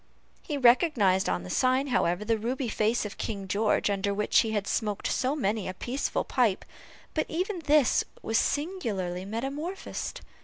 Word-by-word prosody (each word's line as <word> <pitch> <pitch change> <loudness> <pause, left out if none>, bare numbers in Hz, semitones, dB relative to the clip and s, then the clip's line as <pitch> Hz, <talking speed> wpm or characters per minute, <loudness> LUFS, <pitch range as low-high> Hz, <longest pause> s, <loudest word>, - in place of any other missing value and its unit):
He 295 -4 -4
recognized 240 - +4
on 90 0 -1
the 90 - -7
sign, 255 +2 +2
however, 180 -4 +1
the 225 0 +1
ruby 245 +3 -2
face 220 +2 +1
of 205 - -7
King 200 -3 -4
George, 205 +3 +1
under 200 0 0
which 210 +1 +3
he 225 - +2
had 210 -2 -1
smoked 210 -2 -2
so 265 +3 0
many 215 -7 -1
a 185 - -5
peaceful 255 +8 -2
pipe, 230 -7 +1 0.5
but 310 - 0
even 365 +3 -2
this 295 -4 +4 0.2
was 225 +1 +2
singularly 210 - -2
metamorphosed. 275 - -4
225 Hz, 160 wpm, -28 LUFS, 200-275 Hz, 0.5 s, recognized